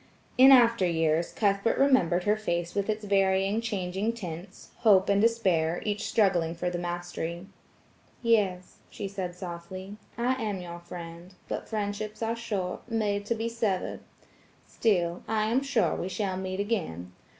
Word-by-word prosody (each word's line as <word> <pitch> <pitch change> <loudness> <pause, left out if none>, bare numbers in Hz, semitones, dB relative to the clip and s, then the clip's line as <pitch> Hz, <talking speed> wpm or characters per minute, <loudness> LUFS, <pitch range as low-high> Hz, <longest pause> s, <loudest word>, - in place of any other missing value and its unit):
In 265 +2 +8
after 235 -5 +6
years, 165 0 +1
Cuthbert 200 +1 +1
remembered 220 -11 +3
her 210 +2 +3
face 175 -5 -2
with 200 +1 -1
its 215 0 -2
varying, 195 +1 +2
changing 200 0 -2
tints–hope 190 +1 0
and 200 0 +4
despair–each 205 -3 +1
struggling 175 -6 +2
for 175 +1 -2
the 175 - -3
mastery. 175 0 -4 0.8
"Yes," 200 -6 +1
she 200 - -5
said 190 -3 -5
softly, 185 +2 -7 0.2
"I 250 +2 0
am 210 -3 -2
your 175 -1 -7
friend, 170 +1 -9
but - - -5
friendships 215 0 -3
are 225 +1 0
short–made 210 -1 -2
to 230 - +1
be 225 +1 -2
severed. 220 -5 -1 0.7
Still, 175 -6 0
I 220 -1 +1
am 255 +3 +3
sure 275 -5 +1
we 180 - -3
shall 190 -1 -2
meet 185 0 -4
again. 165 - -2
195 Hz, 140 wpm, -28 LUFS, 175-220 Hz, 0.8 s, In